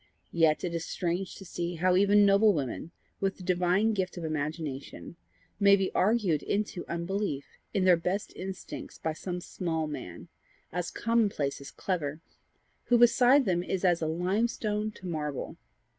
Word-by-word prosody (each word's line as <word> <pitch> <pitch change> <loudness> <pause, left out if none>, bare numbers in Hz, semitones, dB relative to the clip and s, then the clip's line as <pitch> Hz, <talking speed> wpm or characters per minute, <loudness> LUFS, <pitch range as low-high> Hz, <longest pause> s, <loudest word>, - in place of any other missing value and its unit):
Yet 160 -2 +3
it 175 -2 -2
is 165 -1 -2
strange 180 +2 -2
to 195 - -11
see 175 0 -4
how 180 +2 +2
even 200 +2 +5
noble 200 +2 +5
women, 140 +2 -3 0.3
with 195 -1 -1
the 185 - -10
divine 180 +4 +2
gift 190 -3 -2
of 175 - -5
imagination, 155 -1 -4 0.4
may 200 -1 +7
be 195 -1 -1
argued 190 -7 +2
into 200 -3 -2
unbelief 170 -3 -2 0.3
in 195 -3 +1
their 180 -2 +6
best 180 +4 -2
instincts 190 0 -7
by 160 - -2
some 180 +2 -5
small 165 -3 -2
man, 90 - -7 0.4
as 175 0 -2
common 230 -2 +1
place 140 -7 -3
as 140 - -8
clever, 155 -5 -3 0.7
who 245 - +4
beside 245 +3 +6
them 175 -2 +1
is 190 +1 -2
as 175 -2 +3
limestone 210 +6 0
to 185 - -13
marble. 150 -5 -3
180 Hz, 160 wpm, -29 LUFS, 160-200 Hz, 0.7 s, may